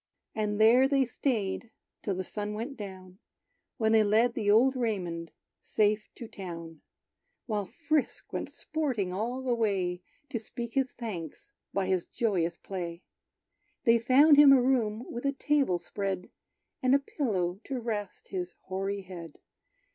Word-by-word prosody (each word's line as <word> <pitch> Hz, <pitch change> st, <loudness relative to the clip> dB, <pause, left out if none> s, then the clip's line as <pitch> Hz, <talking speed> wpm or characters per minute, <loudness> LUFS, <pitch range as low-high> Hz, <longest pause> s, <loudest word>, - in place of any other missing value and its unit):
And 210 Hz, -1 st, -1 dB
there 240 Hz, +5 st, +7 dB
they 275 Hz, -1 st, +3 dB
staid 230 Hz, -3 st, -1 dB, 0.3 s
till 200 Hz, -, -1 dB
the 185 Hz, -, -2 dB
sun 210 Hz, +2 st, -4 dB
went 240 Hz, +6 st, -4 dB
down, 190 Hz, -3 st, -9 dB, 0.6 s
When 220 Hz, -1 st, +2 dB
they 220 Hz, -1 st, +6 dB
led 225 Hz, +3 st, +3 dB
the 205 Hz, -, -1 dB
old 245 Hz, +6 st, +5 dB
Raymond 180 Hz, -9 st, -2 dB, 0.3 s
safe 210 Hz, 0 st, +1 dB
to 235 Hz, -, -8 dB
town; 165 Hz, -5 st, -8 dB, 0.6 s
While 210 Hz, -4 st, -2 dB
Frisk 305 Hz, +5 st, -1 dB
went -, -, -3 dB
sporting 255 Hz, -12 st, -2 dB
all 240 Hz, +7 st, -2 dB
the 255 Hz, -2 st, +1 dB
way, 190 Hz, -6 st, 0 dB, 0.3 s
To 230 Hz, -, -1 dB
speak 235 Hz, +1 st, -6 dB
his 265 Hz, -2 st, +1 dB
thanks 230 Hz, -, -7 dB, 0.2 s
by 195 Hz, -1 st, 0 dB
his 185 Hz, -2 st, 0 dB
joyous 180 Hz, -7 st, 0 dB
play. 175 Hz, -2 st, -6 dB, 0.8 s
They 230 Hz, 0 st, +5 dB
found 280 Hz, +6 st, +6 dB
him 290 Hz, -1 st, +9 dB
a 270 Hz, -, +8 dB
room 245 Hz, -3 st, +1 dB
with 240 Hz, -, -5 dB
a 280 Hz, 0 st, +1 dB
table 275 Hz, -9 st, +2 dB
spread, 190 Hz, +1 st, -4 dB, 0.5 s
And 255 Hz, +1 st, +4 dB
a -, -, +5 dB
pillow 195 Hz, -, -1 dB
to 270 Hz, -3 st, -3 dB
rest 215 Hz, -4 st, -4 dB
his 180 Hz, -2 st, -4 dB
hoary 195 Hz, +1 st, -3 dB
head. 170 Hz, -4 st, -9 dB
215 Hz, 150 wpm, -29 LUFS, 190-250 Hz, 0.8 s, him